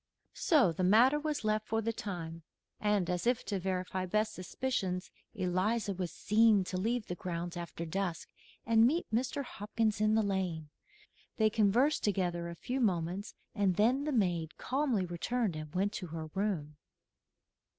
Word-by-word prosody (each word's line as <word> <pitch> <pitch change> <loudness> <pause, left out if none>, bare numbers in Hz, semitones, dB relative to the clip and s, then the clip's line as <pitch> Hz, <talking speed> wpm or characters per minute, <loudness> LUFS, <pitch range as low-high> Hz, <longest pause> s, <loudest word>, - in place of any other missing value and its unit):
So 280 - +4
the 175 +3 -2
matter 235 +10 +5
was 300 -3 -2
left, 215 0 0
for 225 - 0
the 225 +1 -1
time; 170 -6 -5 0.4
and 210 -4 +1
as 180 +4 -1
if 245 -1 +1
to 200 -3 -2
verify 185 0 -2
Beth's 215 +3 +1
suspicions 185 -2 -3 0.2
Eliza 200 +3 0
was 180 -2 -3
seen 215 -2 +4
to 185 0 -4
leave 225 +4 0
the - - -4
grounds 175 -1 -4
after 170 -1 -5
dusk 175 0 -3 0.4
and 225 0 +5
meet 330 +7 0
Mr. 255 +4 0
Hopkins 215 -2 -2
in 215 0 +3
the 220 - +3
lane. 180 -6 -2 0.7
They 215 -1 +3
conversed 230 +8 +3
together 175 -4 0
a 170 - -7
few 250 +10 -3
moments, 185 -1 -1 0.2
and 200 -4 +2
then 245 +8 +3
the 300 - 0
maid 175 - 0
calmly 255 -7 0
returned 185 +3 -1
and 155 -1 -6
went 200 +3 +1
to 180 - -5
her 160 0 -5
room. 175 -8 -2
200 Hz, 160 wpm, -32 LUFS, 180-225 Hz, 0.7 s, matter